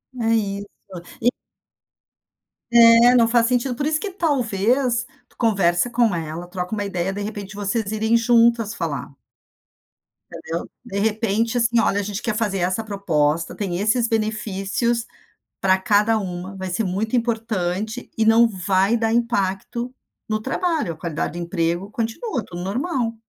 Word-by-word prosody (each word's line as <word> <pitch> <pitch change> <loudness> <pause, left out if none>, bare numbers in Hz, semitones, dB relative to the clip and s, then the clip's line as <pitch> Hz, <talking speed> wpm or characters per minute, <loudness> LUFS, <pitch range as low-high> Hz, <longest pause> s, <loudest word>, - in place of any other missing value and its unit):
É 230 -2 +1
isso 200 -1 -2 0.5
e 245 +2 +3 1.4
É, 235 +1 +7
não 235 -2 +5
faz 235 -1 +4
sentido. 250 0 0
Por 285 +4 -2
isso 310 0 +1
que, 410 -2 -4
talvez, 245 - +1 0.2
tu - - -29
conversa 195 -3 +2
com 235 -3 +2
ela, 165 +1 -4
troca 180 +2 -5
uma 205 -1 -1
ideia. 190 -1 -2
De 205 - -5
repente, 205 -1 -6
vocês 205 +1 -2
irem 220 +2 +2
juntas 230 -1 +3
falar. 145 -5 -4 1.1
Entendeu? 165 +1 -6 0.2
De 200 +1 -3
repente, 220 +2 0
assim: 235 0 +2
"Olha, 205 -2 +2
a - - -5
gente 205 +2 -4
quer 235 -3 -2
fazer 210 -3 -1
essa 185 +5 0
proposta. 165 -6 0
Tem 185 -4 -3
esses 225 +4 +2
benefícios 215 +1 -1 0.6
para 190 -1 +4
cada 210 +3 +3
uma. 185 -1 -5
Vai 190 -1 -5
ser 205 +5 -1
muito 200 +6 -2
importante 220 -2 -2
e 220 - +2
não 225 +1 +6
vai 195 +2 +1
dar 225 -1 0
impacto 235 +1 -1 0.3
no 215 0 -1
trabalho. 300 - -1
A - - -17
qualidade 165 -1 -3
do - - -3
emprego 170 +2 -1
continua, 235 - -3
tudo 175 0 -7
normal". 240 - -1
215 Hz, 150 wpm, -22 LUFS, 190-235 Hz, 1.4 s, É